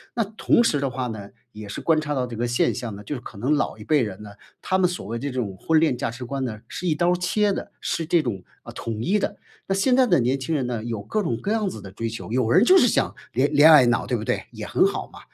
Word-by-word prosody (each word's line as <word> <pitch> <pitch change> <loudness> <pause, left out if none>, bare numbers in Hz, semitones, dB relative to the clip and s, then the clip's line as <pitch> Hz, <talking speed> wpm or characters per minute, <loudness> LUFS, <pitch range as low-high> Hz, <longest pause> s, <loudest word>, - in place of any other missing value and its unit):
那 230 - +2
同 215 +3 +2
时 155 -11 +2
的 140 -1 -1
话 125 0 -3
呢， 105 -3 -7 0.2
也 105 -1 -9
是 - - -5
观 160 -2 +2
察 150 -1 -3
到 130 -2 0
这 120 -2 -7
个 120 +2 -1
现 120 - +1
象 120 -4 -5
呢， 105 - -10
就 125 - -5
是 125 - -7
可 110 - -11
能 130 +8 +1
老 150 - -1
一 - - -10
辈 150 -3 +2
人 105 -3 -4
呢， 105 - -10 0.3
他 190 - 0
们 180 -1 +3
所 180 - -6
谓 115 +3 -4
这 140 0 -3
种 115 -7 -3
婚 160 +7 +2
恋 155 -6 +2
价 - - -2
值 125 +2 -7
观 135 +2 -3
呢， 110 -4 -4
是 180 - -5
一 155 - +2
刀 175 +3 +2
儿 - - +3
切 200 +3 +1
的， - - -6
是 165 - -2
这 170 -2 +3
种， 100 -7 -4 0.2
呃， - - -9
统 115 -1 -5
一 205 - +2
的。 205 - -3 0.3
那 - - +3
现 250 +6 +3
在 260 -1 +4
的 175 -8 +4
年 130 +3 0
轻 145 +5 -2
人 135 -4 0
呢， 120 -3 -3
有 115 -3 -4
各 210 - -1
种 120 - -1
各 205 - -3
样 215 -3 0
子 110 - -8
的 95 -2 -10
追 115 +4 -4
求， 110 -1 -7
有 120 -2 +1
人 185 - +5
就 375 +5 +7
是 245 - +5
想 - - +1 0.2
恋 135 +5 +1
恋 150 +2 +8
爱 140 -5 +8
脑， 120 0 +1
对 125 - 0
不 110 - -5
对？ - - -2
也 - - -7
很 - - +3
好 - - -4
嘛。 - - -11
130 Hz, 325 characters per minute, -23 LUFS, 115-175 Hz, 0.3 s, 恋